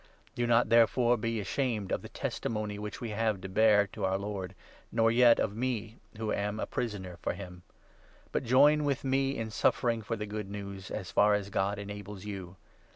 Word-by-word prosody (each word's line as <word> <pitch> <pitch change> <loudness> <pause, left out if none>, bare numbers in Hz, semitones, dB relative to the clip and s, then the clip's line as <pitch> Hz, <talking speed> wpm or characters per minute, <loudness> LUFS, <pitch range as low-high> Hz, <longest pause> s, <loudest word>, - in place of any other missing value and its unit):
Do 120 0 -1
not, 120 -1 +4
therefore, 120 +1 +5
be 115 0 -2
ashamed 110 -1 -2
8 - - +1
of - - -1
the - - -10
testimony 105 -2 -3
which 105 0 -6
we 115 -3 -4
have 110 -1 0
to 95 - -5
bear 105 +1 +4
to 105 - -6
our 95 0 +1
Lord, 95 -2 -5 0.4
nor 115 -1 +3
yet 120 0 +6
of 105 - 0
me 115 -2 -3 0.2
who 110 -1 -2
am 105 +1 -2
a - - -1
prisoner 95 -7 -4
for - - -1
him; 90 -1 -9 0.7
but - - -1
join 145 +5 +5
with 140 -3 0
me 135 +1 +1
in 110 -1 -4
suffering 115 +1 +1
for 110 +2 -3
the 105 -1 -4
Good 105 -1 -5
News, 100 -1 -7
as 95 -5 -5
far 105 +4 +4
as 100 -1 -3
God 100 +2 0
enables 100 -1 -7
you. 95 -3 -6
105 Hz, 200 wpm, -30 LUFS, 100-115 Hz, 0.7 s, yet